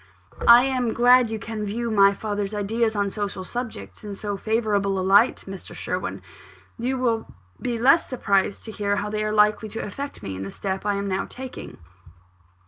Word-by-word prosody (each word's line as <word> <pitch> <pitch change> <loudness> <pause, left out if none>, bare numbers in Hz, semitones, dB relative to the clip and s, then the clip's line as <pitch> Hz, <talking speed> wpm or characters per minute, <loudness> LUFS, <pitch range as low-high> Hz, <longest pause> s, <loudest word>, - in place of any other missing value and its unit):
"I 240 +1 +9
am 255 -3 0
glad 245 0 +5
you 220 - -3
can 215 0 -5
view 230 +3 -2
my 200 -2 +6
father's 205 0 -3
ideas 220 +2 0
on 200 -1 0
social 200 -2 -4
subjects 185 - -6
in 205 -1 -6
so 205 0 -4
favourable 205 -2 0
a 185 - -1
light, 205 +5 +4
Mr. 195 -1 -9
Sherwin. - - -4 0.6
You 255 +3 -1
will 235 -3 0 0.3
be 240 -2 -2
less 275 +8 +4
surprised 200 -5 0
to 220 - -6
hear 205 -1 -1
how 210 +1 -3
they 215 0 -1
are 215 - -1
likely 210 +1 +3
to 225 - -5
affect 280 +8 -7
me 95 - -5
in 95 - -6
the 95 - -5
step 190 - -4
I 205 - +1
am 200 0 -2
now 190 0 -1
taking." 260 0 -8
210 Hz, 190 wpm, -24 LUFS, 200-235 Hz, 0.6 s, I